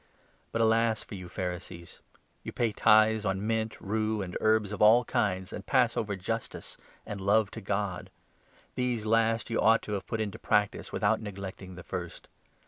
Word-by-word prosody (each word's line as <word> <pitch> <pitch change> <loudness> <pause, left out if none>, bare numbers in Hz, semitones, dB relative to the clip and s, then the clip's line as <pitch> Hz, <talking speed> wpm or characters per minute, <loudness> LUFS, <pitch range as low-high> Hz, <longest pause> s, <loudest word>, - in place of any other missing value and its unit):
But 115 - 0
alas 115 0 +2
for - - -24
42 100 - -6
you 90 -1 -9
Pharisees! 90 -2 -6 0.4
You - - -6
pay 120 -2 0
tithes 110 +1 +4
on 95 0 -1
mint, 110 0 -1
rue, 110 0 -1
and 90 -1 -7
herbs 110 -2 +2
of 105 - -5
all 115 +3 +6
kinds, 95 -4 -1
and - - -6
pass - - +2
over 105 -2 -2
justice 115 +5 -5 0.3
and 100 -2 -6
love 100 +1 +2
to 110 - -8
God. 100 -2 -3 0.6
These 125 -3 -1
last 115 +1 +1
you 115 - +1
ought 115 +1 +4
to - - -7
have 100 -2 -3
put 115 - -3
into 105 -3 -3
practice 105 -1 0
without 110 +2 +1
neglecting 95 -2 -7
the 90 - -10
first. 90 -1 -7
105 Hz, 180 wpm, -29 LUFS, 95-110 Hz, 0.6 s, all